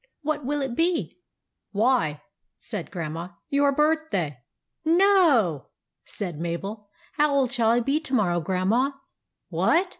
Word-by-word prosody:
" -, -, -57 dB
What 305 Hz, -1 st, -1 dB
will 290 Hz, +2 st, -1 dB
it 260 Hz, -3 st, -3 dB
be? 340 Hz, +2 st, 0 dB
" -, -, -59 dB
" -, -, -58 dB
Why," 205 Hz, -, +1 dB, 0.3 s
said 200 Hz, -6 st, -6 dB
Grandma, 170 Hz, 0 st, -5 dB
" -, -, -55 dB
your 285 Hz, 0 st, +3 dB
birthday." 300 Hz, -, 0 dB, 0.4 s
"No!" 320 Hz, -, +4 dB, 0.4 s
said 175 Hz, -7 st, -5 dB
Mabel. 195 Hz, +5 st, -5 dB, 0.3 s
"How 300 Hz, -1 st, +3 dB
old 270 Hz, -3 st, +2 dB
shall 235 Hz, -4 st, +2 dB
I 235 Hz, +1 st, +3 dB
be 275 Hz, +5 st, +1 dB
to 270 Hz, -4 st, -3 dB
morrow, 175 Hz, -6 st, +2 dB
Grandma? 195 Hz, -, +1 dB, 0.3 s
" -, -, -58 dB
"What? 360 Hz, +3 st, +2 dB
240 Hz, 155 wpm, -25 LUFS, 180-295 Hz, 0.4 s, No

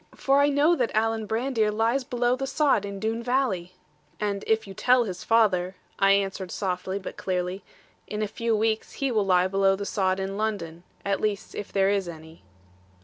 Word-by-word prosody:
For 275 Hz, +1 st, +2 dB
I 285 Hz, -, +4 dB
know 290 Hz, +4 st, +4 dB
that 245 Hz, -, +1 dB
Alan 220 Hz, 0 st, +1 dB
Brandir 225 Hz, -1 st, 0 dB
lies 225 Hz, +5 st, +1 dB
below 245 Hz, 0 st, 0 dB
the 270 Hz, +1 st, -4 dB
sod 275 Hz, -8 st, +2 dB
in 200 Hz, -1 st, -6 dB
Doone 225 Hz, +2 st, -2 dB
valley.' 235 Hz, -8 st, -1 dB, 0.5 s
'And 205 Hz, -1 st, -2 dB
if 220 Hz, 0 st, +2 dB
you 195 Hz, -, -9 dB
tell 250 Hz, +5 st, +3 dB
his 185 Hz, -5 st, -6 dB
father,' 195 Hz, -5 st, +2 dB, 0.2 s
I 195 Hz, 0 st, +5 dB
answered 195 Hz, -2 st, -1 dB
softly, 185 Hz, +1 st, -3 dB
but 200 Hz, -, -7 dB
clearly, 180 Hz, +1 st, -2 dB, 0.4 s
'in 210 Hz, 0 st, -3 dB
a -, -, -1 dB
few 230 Hz, +2 st, -1 dB
weeks 220 Hz, 0 st, 0 dB
he 275 Hz, -2 st, -1 dB
will 210 Hz, -4 st, +1 dB
lie 180 Hz, -1 st, +4 dB
below 195 Hz, 0 st, +3 dB
the 200 Hz, +1 st, -5 dB
sod 190 Hz, -1 st, 0 dB
in 195 Hz, +1 st, -3 dB
London; 190 Hz, -7 st, -3 dB, 0.2 s
at 200 Hz, -1 st, 0 dB
least 210 Hz, -2 st, -2 dB
if 205 Hz, -, -6 dB
there 195 Hz, -1 st, +2 dB
is 195 Hz, -3 st, 0 dB
any.' 160 Hz, 0 st, -11 dB
205 Hz, 195 wpm, -26 LUFS, 190-230 Hz, 0.5 s, I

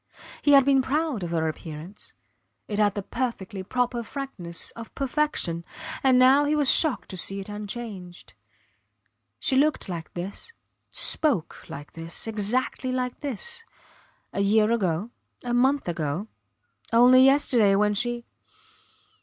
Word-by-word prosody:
He 290 Hz, -, +4 dB
had 275 Hz, -2 st, +7 dB
been 275 Hz, -1 st, +4 dB
proud 290 Hz, -3 st, -1 dB
of 175 Hz, -, -3 dB
her 160 Hz, -1 st, 0 dB
appearance. 160 Hz, +4 st, -7 dB, 0.5 s
It 210 Hz, -1 st, -3 dB
had 205 Hz, -2 st, +3 dB
the 205 Hz, -, -3 dB
perfectly 210 Hz, -5 st, -4 dB
proper 245 Hz, +4 st, -1 dB
frankness 215 Hz, -9 st, -2 dB
of 230 Hz, -1 st, -11 dB
perfection 275 Hz, -, -1 dB, 0.4 s
and 265 Hz, -3 st, +4 dB
now 260 Hz, +3 st, +6 dB
he 300 Hz, +1 st, +1 dB
was 290 Hz, -3 st, +4 dB
shocked 310 Hz, -5 st, +2 dB
to 185 Hz, -, -5 dB
see 195 Hz, +2 st, -1 dB
it 195 Hz, -, -7 dB
unchanged. 205 Hz, -4 st, -7 dB, 1.0 s
She 265 Hz, -, +1 dB
looked 300 Hz, +3 st, +2 dB
like 170 Hz, -3 st, -6 dB
this, 195 Hz, -, -6 dB, 0.4 s
spoke 270 Hz, -, -1 dB
like 145 Hz, +1 st, -8 dB
this, 165 Hz, +1 st, -2 dB
exactly 225 Hz, +4 st, -1 dB
like 250 Hz, -1 st, -2 dB
this, 295 Hz, -, -4 dB, 0.7 s
a 200 Hz, -, -1 dB
year 210 Hz, +2 st, +3 dB
ago, 200 Hz, -1 st, 0 dB, 0.3 s
a 245 Hz, -1 st, -2 dB
month 265 Hz, +2 st, +2 dB
ago 165 Hz, +3 st, -2 dB, 0.6 s
only 250 Hz, +2 st, +7 dB
yesterday 255 Hz, -7 st, +4 dB
when 210 Hz, +1 st, +2 dB
she. 240 Hz, +3 st, -1 dB
230 Hz, 135 wpm, -25 LUFS, 190-260 Hz, 1.0 s, had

